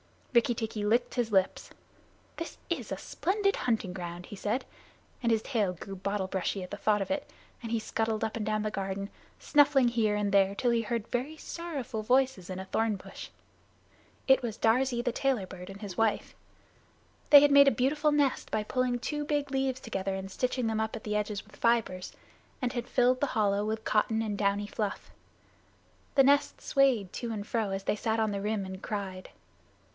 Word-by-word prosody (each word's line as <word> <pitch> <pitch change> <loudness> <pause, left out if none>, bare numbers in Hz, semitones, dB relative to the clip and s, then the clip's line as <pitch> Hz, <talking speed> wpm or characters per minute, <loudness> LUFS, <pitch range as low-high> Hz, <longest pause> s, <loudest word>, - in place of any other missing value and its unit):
Rikki 235 0 +4
tikki 220 -2 -3
licked 235 +4 +2
his 240 -3 0
lips. 190 -2 +1 0.7
"This 330 - -6
is - - -2
a - - -2
splendid 395 +2 0
hunting 225 -6 -1
ground," 175 -1 -6
he - - -8
said, 210 +6 -1 0.6
and 235 -2 +1
his 220 -1 +2
tail 210 -8 0
grew 195 +3 -8
bottle 200 +1 -2
brushy 190 0 -2
at 180 - -9
the 205 - -4
thought 210 0 +2
of - - -7
it, 290 0 -2 0.3
and 230 -2 -6
he 230 - +1
scuttled 220 0 -1
up 220 - -2
and 215 - -3
down 215 0 0
the 215 - -1
garden, 195 0 -3 0.3
snuffing 290 -4 +4
here 220 -3 +1
and 205 -1 0
there 195 0 +4
till 245 +3 +1
he 235 -1 +2
heard 230 0 -2
very 260 +6 -2
sorrowful 280 -10 -5
voices 250 -5 +1
in 185 0 -4
a 190 - -6
thorn 220 +2 0
bush. 190 - -9 1.0
It 265 - +6
was 230 -3 -4
Darzee, 240 +1 +2
the 245 - 0
Tailorbird, 195 -9 -2
and 195 +1 -10
his 195 -4 -7
wife. 225 -2 +1 1.0
They 290 -1 +11
had 290 0 +5
made 280 0 +8
a - - +7
beautiful 295 +4 +1
nest 285 -3 +1
by 215 - 0
pulling 250 +2 0
two 295 +4 -3
big 290 -2 -1
leaves 265 -1 0
together 195 -3 -3
and 190 0 -6
stitching 250 +3 -1
them 220 -1 0
up 220 0 -1
the 210 0 -2
edges 210 -1 -2
with - - -18
fibers, 230 -6 +1 0.5
and 250 -2 0
had 240 -1 -3
filled 255 0 +3
the 285 - +1
hollow 205 -1 +2
with 220 +1 -2
cotton 220 +1 +1
and 210 -2 -2
downy 200 0 +1
fluff. 210 -1 -4 1.0
The 270 - +7
nest 285 +1 +3
swayed 260 -9 +2
to 235 -2 -4
and 205 -2 -4
fro, 220 -2 -1
as 195 0 -3
they 210 - 0
sat 220 +1 0
on 220 -1 +1
the 200 -1 -3
rim 210 -1 -1
and 190 0 -7
cried. 190 -3 -5
220 Hz, 195 wpm, -30 LUFS, 200-255 Hz, 1.0 s, They